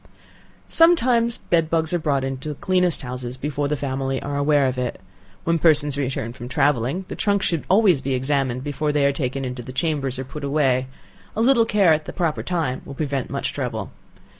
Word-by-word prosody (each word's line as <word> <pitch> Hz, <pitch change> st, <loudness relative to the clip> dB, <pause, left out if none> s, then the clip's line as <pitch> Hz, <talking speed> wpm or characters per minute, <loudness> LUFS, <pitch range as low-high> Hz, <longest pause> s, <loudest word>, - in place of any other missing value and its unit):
Sometimes 250 Hz, -9 st, +4 dB
bed 165 Hz, -2 st, 0 dB
bugs 160 Hz, 0 st, 0 dB
are 175 Hz, -, +2 dB
brought 140 Hz, -4 st, 0 dB
in 135 Hz, 0 st, -2 dB
the 150 Hz, +1 st, -5 dB
cleanest 180 Hz, -1 st, +1 dB
houses 125 Hz, 0 st, -6 dB
before 145 Hz, +1 st, -2 dB
the 150 Hz, +1 st, -1 dB
family 135 Hz, -1 st, -2 dB
are 145 Hz, 0 st, -4 dB
aware 145 Hz, 0 st, +3 dB
of 130 Hz, -1 st, -1 dB
it. 125 Hz, -1 st, -3 dB, 0.4 s
When 165 Hz, 0 st, +1 dB
persons 150 Hz, -3 st, +4 dB
return 130 Hz, -4 st, -3 dB
from 120 Hz, 0 st, -8 dB
travelling, 140 Hz, +6 st, +1 dB
the -, -, -6 dB
trunks 200 Hz, -2 st, +1 dB
should 165 Hz, -4 st, -1 dB
always 190 Hz, -7 st, +4 dB
be 135 Hz, 0 st, -1 dB
examined 130 Hz, -1 st, 0 dB
before 145 Hz, +1 st, -1 dB
they 145 Hz, -1 st, +2 dB
are 140 Hz, -, +3 dB
taken 135 Hz, -1 st, -2 dB
into 125 Hz, -1 st, -5 dB
the 125 Hz, -, -8 dB
chambers, 135 Hz, -2 st, -1 dB
or 130 Hz, -, -3 dB
put 150 Hz, +3 st, -8 dB
away; 135 Hz, -3 st, +1 dB, 0.5 s
a 220 Hz, -, 0 dB
little 240 Hz, -2 st, +5 dB
care 200 Hz, -7 st, +4 dB
at 155 Hz, 0 st, -1 dB
the -, -, -7 dB
proper 165 Hz, -5 st, -1 dB
time 165 Hz, -8 st, -2 dB
will 140 Hz, -, -9 dB
prevent 140 Hz, -3 st, -2 dB
much -, -, -2 dB
trouble. -, -, -4 dB
145 Hz, 200 wpm, -22 LUFS, 130-165 Hz, 0.5 s, little